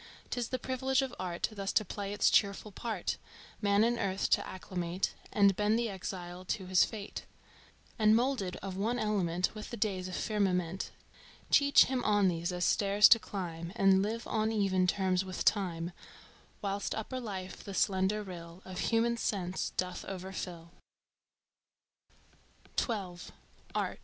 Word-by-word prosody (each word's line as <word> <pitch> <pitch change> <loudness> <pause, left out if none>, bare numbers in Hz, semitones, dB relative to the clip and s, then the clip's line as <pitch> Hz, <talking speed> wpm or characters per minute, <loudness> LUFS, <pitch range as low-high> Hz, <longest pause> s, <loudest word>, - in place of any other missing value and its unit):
'Tis 245 -2 -1
the 255 - -2
privilege 260 +1 0
of 265 - -4
Art 175 -2 -1
Thus 200 -2 -3
to 215 - +3
play 200 +1 -4
its 205 0 +3
cheerful 200 +1 +2
part, 210 -2 -3 0.4
Man 205 0 +4
in 235 +1 +2
Earth 195 0 -1
to - - +3
acclimate 180 -1 -3 0.2
And 200 -2 +5
bend 210 +3 +2
the 235 -1 0
exile 180 -2 -6
to 190 +1 -3
his 185 0 +5
fate, 210 -2 -5 0.7
And, 215 0 +6
moulded 235 -7 0
of 195 -2 -4
one 220 +6 0
element 185 -6 0
With 215 -1 -7
the 235 - -6
days 190 -5 -1
and 185 - -5
firmament, 190 -4 0 0.6
Teach 285 0 +7
him 255 -2 -1
on 205 -2 +4
these 170 0 -2
as 180 -1 -1
stairs 205 0 +5
to 230 - +8
climb 170 -4 -5
And 195 -3 +5
live 225 +3 -2
on 220 0 0
even 190 -4 +2
terms 185 -1 +1
with 185 -1 -4
Time; 175 -4 +1 0.7
Whilst 200 0 -2
upper 240 +4 -4
life 195 -6 -6
the 200 -2 -7
slender 195 +3 +1
rill 175 -1 -9
Of 185 -1 -6
human 235 +1 +2
sense 190 -5 -2
doth 180 0 -2
overfill. 180 -3 -6
195 Hz, 145 wpm, -32 LUFS, 185-215 Hz, 0.7 s, to